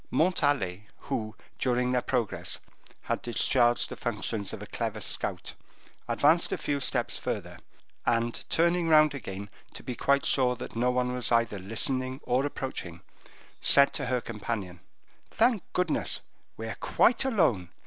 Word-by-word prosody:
Montalais, 145 - +1 0.2
who, 110 -1 -2 0.2
during 125 0 +1
their 125 -1 +2
progress, 120 -6 -2 0.5
had - - -2
discharged 120 0 +2
the - - -7
functions 110 -2 -3
of - - -6
a - - -6
clever - - -3
scout, - - -1 0.5
advanced 160 +4 +3
a - - 0
few 145 -1 -1
steps 130 - -1
further, - - -4 0.4
and 115 0 0
turning 170 +1 +2
round 155 -2 +6
again, 100 -6 -6 0.3
to - - -8
be 125 - -4
quite 140 +2 +2
sure 125 -2 +3
that - - -8
no 120 +2 +2
one 125 0 0
was 125 -3 -1
either 115 -3 +2
listening 130 +6 -1
or 125 +2 +1
approaching, 90 -12 -6 0.6
said 140 0 +6
to 135 -4 -1
her 125 -1 0
companion, 105 -5 -5 0.5
"Thank 230 -3 +2
goodness, 155 - 0 0.4
we 110 - -5
are 110 - -5
quite 245 - +3
alone! 160 - +1
125 Hz, 150 wpm, -28 LUFS, 110-140 Hz, 0.6 s, round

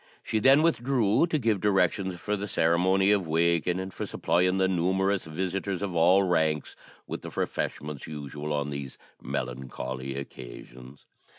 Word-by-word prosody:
She 110 - 0
then 135 +7 +6
withdrew, 130 -4 +2
to 165 - 0
give 115 -7 +1
directions 95 -2 +1
for 105 +3 -1
the 105 0 -4
ceremony 95 +3 +3
of 100 -4 +2
waking, 85 +2 +1
and 95 0 -5
for - - -5
supplying 90 +2 +1
the 95 0 +3
numerous 95 +2 +1
visitors 95 +4 -3
of 95 -3 -3
all 90 +4 +5
ranks 80 -4 0 0.3
with - - -6
the - - -7
refreshments 75 -1 -4
usual 75 0 -6
on 75 -1 -1
these 70 -2 -6 0.2
melancholy 65 +1 -5
occasions. 65 -1 -10
90 Hz, 150 wpm, -27 LUFS, 75-100 Hz, 0.3 s, then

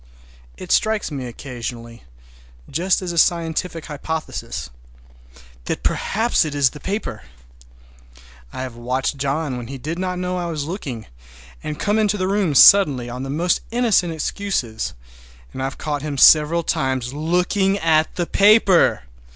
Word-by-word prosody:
It - - -8
strikes 215 -5 +1
me 135 -3 -5
occasionally, 120 -2 -8 0.6
just 180 +6 0
as 180 - -3
a 170 - 0
scientific 165 -1 0
hypothesis, 140 - -5 0.9
that - - -3
perhaps 225 +4 +1
it 150 -2 -4
is 140 -3 +3
the 150 - -11
paper! 195 - -4 1.3
I 130 - -5
have 125 -3 -7
watched 125 +4 -2
John 140 0 -2
when 120 -1 -7
he 135 +2 -7
did 155 +7 -5
not 185 -1 -2
know 180 0 -2
I 175 -1 -3
was 150 -3 -3
looking, 140 - -6 0.6
and 150 - -5
come 210 +2 +1
into 210 -1 +1
the 185 -1 -1
room 195 -6 0
suddenly 135 -8 +6
on 125 +1 -6
the 135 - -5
most 170 +5 0
innocent 225 -7 +2
excuses, 160 - -3 0.6
and - - -6
I've 135 0 -3
caught 145 -2 -3
him 145 -1 -4
several 155 +4 +6
times 130 -5 -1
looking 180 +6 +1
at 160 -3 +1
the 175 - -1
paper! 200 - +4
155 Hz, 150 wpm, -21 LUFS, 130-185 Hz, 1.3 s, suddenly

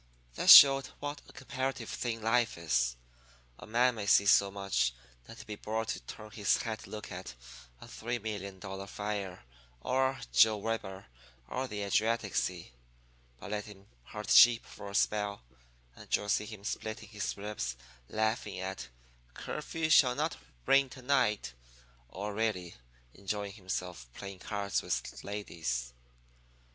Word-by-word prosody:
"That - - 0
showed 135 -1 +11
what 145 0 -5
a - - -12
comparative 130 -3 -4
thing 115 -2 -3
life 115 -1 +2
is. 60 -7 +1 0.6
A - - -11
man 120 +3 +3
may 105 -3 -5
see 100 +1 +6
so 100 0 +5
much 100 -11 0 0.3
that - - -12
he'd - - -10
be 105 - -6
bored 110 +2 -3
to - - -2
turn 110 -1 -10
his 105 -2 +2
head 110 -2 -4
to - - -12
look 105 0 -7
at - - -7 0.4
a - - -11
$3,000,000 100 -4 -5
fire 100 -7 -4 0.4
or 130 - 0
Joe 110 - +6
Weber 100 -3 -4 0.4
or 130 - -3
the 105 -4 -4
Adriatic 110 +1 0
Sea. 90 -5 -2 0.7
But 105 - -8
let 105 -1 -2
him 100 -2 -13 0.2
herd - - -6
sheep 120 -1 +8
for 100 - -10
a 100 - -7
spell, 105 - 0 0.5
and - - -1
you'll 105 - -3
see 105 - +1
him 105 -3 -10
splitting 110 0 -5
his 105 -3 -4
ribs 100 -13 -4 0.3
laughing 110 +1 -1
at 65 0 -5 0.5
'Curfew 160 +1 -3
Shall 125 -5 +6
Not 155 +3 -1 0.3
Ring 135 -1 +4
To 130 0 -12
night,' 125 - +1 0.6
or 100 +6 -5
really 100 -5 -1 0.4
enjoying 100 +1 -4
himself 90 - -5
playing 100 -1 -8
cards 100 -1 -2
with - - -4
ladies. 80 -12 -4
105 Hz, 150 wpm, -31 LUFS, 95-115 Hz, 0.7 s, showed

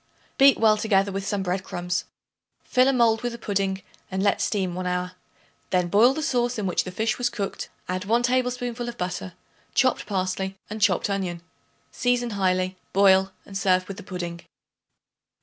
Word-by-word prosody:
Beat 275 -1 +7
well 215 -1 +4
together 200 -2 +2
with 195 0 -4
some 200 -2 -1
bread 185 +1 -1
crumbs; 180 0 -3 0.6
fill 255 0 +3
a - - +5
mold 230 -3 +3
with 245 -1 -2
the - - -6
pudding 195 -3 -1 0.3
and 190 0 -2
let 200 - +2
steam 190 -4 0
one 180 +1 -3
hour; 180 0 -1 0.6
then 180 -1 +1
boil 230 +8 +5
the 315 - -3
sauce 245 -2 0
in 210 - -2
which 180 - 0
the 185 - -5
fish 220 +6 -1
was 245 0 +1
cooked, 210 -5 -4 0.2
add 185 +2 -3
1 230 +3 +2
tablespoonful 245 -1 -1
of 240 - -8
butter, 180 0 -4 0.4
chopped 255 -1 +2
parsley 190 -1 -2
and 215 0 -5
chopped 200 -3 +3
onion. 185 -4 -3 0.5
Season 245 -1 0
highly; 185 -2 0 0.2
boil 190 0 +5
and 195 - -11
serve 185 -1 +2
with 195 - -7
the - - -7
pudding. 175 -3 -6
195 Hz, 180 wpm, -25 LUFS, 185-235 Hz, 0.6 s, Beat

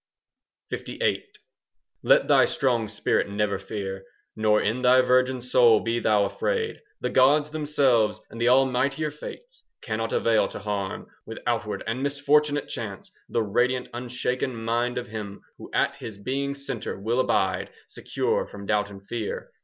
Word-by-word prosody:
LVIII - - -2 0.8
Let - - +4
thy - - +6
strong 120 -5 0
spirit 105 -1 0
never 100 -1 -1
fear, 95 -2 -5 0.3
Nor 110 -1 +3
in 110 +5 -1
thy 130 0 +6
virgin 130 0 +2
soul 120 -3 +5
be 115 +2 -1
thou 105 -3 +3
afraid. 450 - -2 0.2
The - - -1
gods 145 +3 +4
themselves 140 -8 +2
and 115 - -7
the 120 - +4
almightier 135 +3 +2
fates 485 - -10 0.2
Cannot 115 0 -3
avail 115 -1 +2
to - - -8
harm 100 -2 -3 0.2
With - - -7
outward - - -1
and 115 +3 -2
misfortunate 145 +1 +2
chance 105 -6 -6
5 - - -39
The 115 - +1
radiant 125 +5 0
unshaken 125 +1 -2
mind 115 +2 -1
of 125 -1 -4
him 105 -2 -6 0.2
Who - - -10
at - - +1
his 110 -3 -8
being's 140 +5 -3
centre 115 -7 -4
will 115 +5 0
abide, 130 - +1 0.2
Secure - - -2
from 100 -1 -10
doubt 105 0 +1
and 100 -1 -12
fear. 115 -2 -4
120 Hz, 155 wpm, -25 LUFS, 105-135 Hz, 0.8 s, thy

